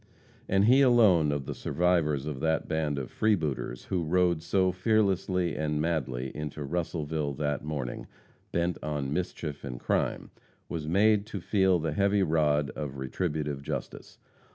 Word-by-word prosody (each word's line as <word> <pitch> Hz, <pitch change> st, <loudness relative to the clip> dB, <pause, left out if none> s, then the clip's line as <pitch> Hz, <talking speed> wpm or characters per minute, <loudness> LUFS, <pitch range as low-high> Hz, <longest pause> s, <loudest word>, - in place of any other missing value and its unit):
And 100 Hz, +1 st, +4 dB
he 130 Hz, +5 st, +6 dB
alone 105 Hz, -, +5 dB
of 70 Hz, -2 st, -2 dB
the -, -, -4 dB
survivors 80 Hz, -5 st, +1 dB
of 75 Hz, -4 st, -4 dB
that 80 Hz, +2 st, 0 dB
band 75 Hz, -2 st, -1 dB
of 65 Hz, -3 st, -5 dB
freebooters 80 Hz, -, 0 dB
who 90 Hz, -3 st, -1 dB
rode 85 Hz, 0 st, +2 dB
so 95 Hz, +2 st, +2 dB
fearlessly 95 Hz, -3 st, +1 dB
and 75 Hz, -1 st, -1 dB
madly 65 Hz, -6 st, -2 dB
into 75 Hz, 0 st, -5 dB
Russellville 80 Hz, -1 st, -2 dB
that 75 Hz, -1 st, -2 dB
morning, 70 Hz, -5 st, -4 dB, 0.4 s
bent 85 Hz, 0 st, 0 dB
on 75 Hz, -2 st, -2 dB
mischief 80 Hz, -4 st, -4 dB
and 60 Hz, -3 st, -6 dB
crime, -, -, -1 dB, 0.4 s
was 80 Hz, -3 st, -4 dB
made 105 Hz, +4 st, +3 dB
to 105 Hz, -, -5 dB
feel 95 Hz, +1 st, +2 dB
the 80 Hz, -1 st, -2 dB
heavy 100 Hz, +3 st, +2 dB
rod 75 Hz, -3 st, +2 dB
of 70 Hz, -3 st, -6 dB
retributive 75 Hz, +1 st, -2 dB
justice. 70 Hz, -, -6 dB
80 Hz, 150 wpm, -28 LUFS, 75-90 Hz, 0.4 s, he